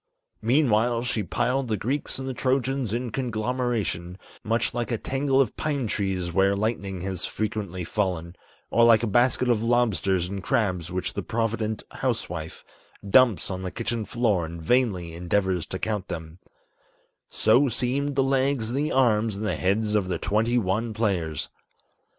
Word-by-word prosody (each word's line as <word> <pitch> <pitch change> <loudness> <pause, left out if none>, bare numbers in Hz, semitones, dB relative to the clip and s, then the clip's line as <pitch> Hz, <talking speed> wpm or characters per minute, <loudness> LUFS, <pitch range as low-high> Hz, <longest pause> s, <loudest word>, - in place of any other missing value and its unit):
Meanwhile 120 -2 +2
she 125 -3 0
piled 125 +8 0
the 110 -2 0
Greeks 135 +9 -2
and 130 0 -5
the 130 - -2
Trojans 130 -1 0
in 120 +1 -2
conglomeration, 115 -7 -2 0.3
Much 115 +2 0
like 120 -1 -2
a 115 - +1
tangle 135 +3 0
of 135 - +2
pine 145 -4 -1
trees 95 -4 -1
where 95 +2 +3
lightning 100 -3 -2
has 95 -2 -2
frequently 100 -4 -3
fallen, 90 -2 -2 0.4
Or 115 - +4
like 115 -1 +6
a - - +3
basket 120 +3 +2
of 120 -3 +2
lobsters 105 -7 +1
and 100 +1 -5
crabs 90 -5 0
which 90 0 -2
the - - -3
provident 110 -1 -2
housewife 80 -2 -3 0.4
Dumps 115 -2 +4
on 95 0 -4
the 95 - -3
kitchen 115 +2 -3
floor 105 -4 +1
and 85 +1 -6
vainly 90 -4 +1
endeavors 90 0 0
to 95 - -4
count 105 -2 -2
them, 80 +1 -7 0.9
So 125 +6 +3
seemed 130 +5 -1
the 135 - +3
legs 135 -3 +1
and 135 - -1
the 150 +2 0
arms 115 -5 +2
and 110 - -3
the - - 0
heads 105 +3 0
of 105 -3 +1
the 90 - -1
twenty 110 +4 +1
one 110 +2 0
players. 90 -9 -1
110 Hz, 160 wpm, -25 LUFS, 95-125 Hz, 0.9 s, like